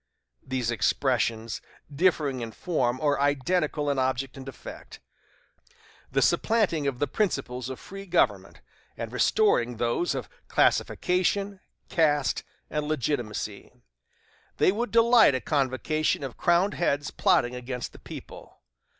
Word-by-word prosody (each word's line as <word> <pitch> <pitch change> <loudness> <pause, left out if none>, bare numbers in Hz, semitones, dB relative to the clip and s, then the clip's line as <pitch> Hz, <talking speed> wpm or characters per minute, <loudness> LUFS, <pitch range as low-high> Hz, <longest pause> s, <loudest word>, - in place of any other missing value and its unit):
These 130 -3 -2
expressions, 115 -2 0 0.3
differing 150 -5 +2
in 115 -1 -6
form, 130 -8 -1
are 145 -2 +2
identical 145 +2 +1
in 140 -2 +1
object 130 0 -1
and 135 0 -8
effect 130 - -10 1.1
the - - +2
supplanting 200 -10 +2
the 145 - +1
principles 130 - -2
of 130 - -6
free 195 +1 -10
government, 175 - +1 0.4
and - - -5
restoring 125 - +2
those 120 +7 0
of 130 -4 -4 0.2
classification, 195 +2 +1 0.3
caste, 150 -5 +1 0.2
and 150 -1 -3
legitimacy. 125 -7 -3 0.9
They - - +4
would 235 +5 -2
delight 230 - +6
a - - 0
convocation 145 +2 0
of 135 -3 -5
crowned 175 +4 +2
heads 145 -4 0
plotting 120 +1 +2
against 125 0 -5
the - - -14
people. - - -11
145 Hz, 120 wpm, -27 LUFS, 125-175 Hz, 1.1 s, delight